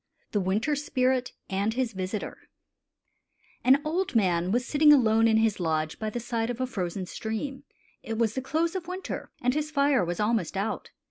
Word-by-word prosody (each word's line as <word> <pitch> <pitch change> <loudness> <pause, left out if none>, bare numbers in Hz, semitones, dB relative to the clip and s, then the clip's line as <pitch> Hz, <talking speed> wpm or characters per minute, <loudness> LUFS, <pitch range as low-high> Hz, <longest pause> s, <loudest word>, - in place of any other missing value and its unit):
THE 205 - +1
WINTER 210 +11 +1
SPIRIT 260 -3 0 0.2
AND 200 +3 -1
HIS 250 -3 -1
VISITOR 190 +2 -4 1.3
|AN 265 +2 +6
old 345 0 -1
man 180 -4 +2
was 245 +3 +1
sitting 300 +1 +5
alone 225 -5 +5
in 220 -1 +4
his 220 -2 +2
lodge 155 -2 -1
by 215 - -2
the 240 - -4
side 230 -1 -2
of 245 0 -4
a 255 - +1
frozen 185 -6 -3
stream. 265 +9 -5 0.4
It 225 -1 -4
was 225 -2 +1
the 260 - -2
close 320 +5 0
of 365 -3 -4
winter, 365 +1 -5
and 250 +1 +3
his 305 +1 -1
fire 280 -6 +3
was 175 0 -3
almost 210 -5 0
ont. 200 +3 -2
230 Hz, 185 wpm, -27 LUFS, 205-275 Hz, 1.3 s, |AN